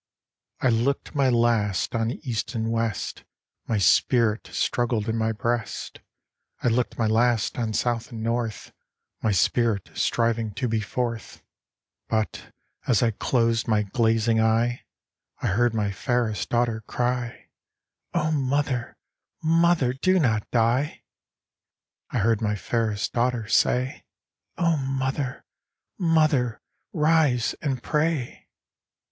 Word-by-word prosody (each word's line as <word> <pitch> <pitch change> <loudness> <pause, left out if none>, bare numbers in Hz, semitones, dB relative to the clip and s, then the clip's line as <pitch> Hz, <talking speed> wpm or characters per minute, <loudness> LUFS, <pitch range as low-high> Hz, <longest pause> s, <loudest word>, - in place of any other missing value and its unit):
v. - - -1
I - - +4
looked 120 +5 0
my 140 -3 +3
last 115 -5 +1
on 115 -1 0
east 120 0 -4
and 110 0 -1
west; 115 -3 -2 0.4
My 115 - +1
spirit 115 +2 +3
struggled 120 -3 0
in 110 - 0
my 110 0 +1
breast. 115 0 -3 0.6
I - - +3
looked 120 +1 0
my 115 - +1
last 115 +1 +2
on 110 -2 -1
south 120 +4 -1
and 110 -2 -6
north, 115 -1 -2 0.5
My 110 - +1
spirit 105 +2 +1
striving 115 -3 0
to 125 - -1
be 110 -1 0
forth; 115 0 -4 0.7
But, 110 -1 -2 0.4
as 120 -5 +3
I 115 - +3
closed 115 +1 +1
my 105 -2 +2
glazing 115 +1 +1
eye, 115 +2 +1 0.5
I - - -5
heard 115 +4 +2
my 105 -2 0
fairest 115 +2 -1
daughter 120 -2 +1
cry: 125 -1 -2 0.3
" - - -54
O 155 +1 +1
Mother, 140 -3 -1 0.5
Mother, 165 -5 +3
do 185 +8 +2
not 110 -8 +1
die! 120 +5 +1 0.5
" - - -66
I - - -2
heard 110 +1 +2
my 105 -1 0
fairest 110 0 -1
daughter 120 -2 0
say: 125 +4 +1 0.3
" - - -51
O 170 -2 +2
Mother, 135 0 -2 0.5
Mother, 155 - +2 0.3
rise 150 -7 +2
and 135 -4 -2
pray 150 -4 -1
120 Hz, 130 wpm, -25 LUFS, 110-130 Hz, 0.7 s, I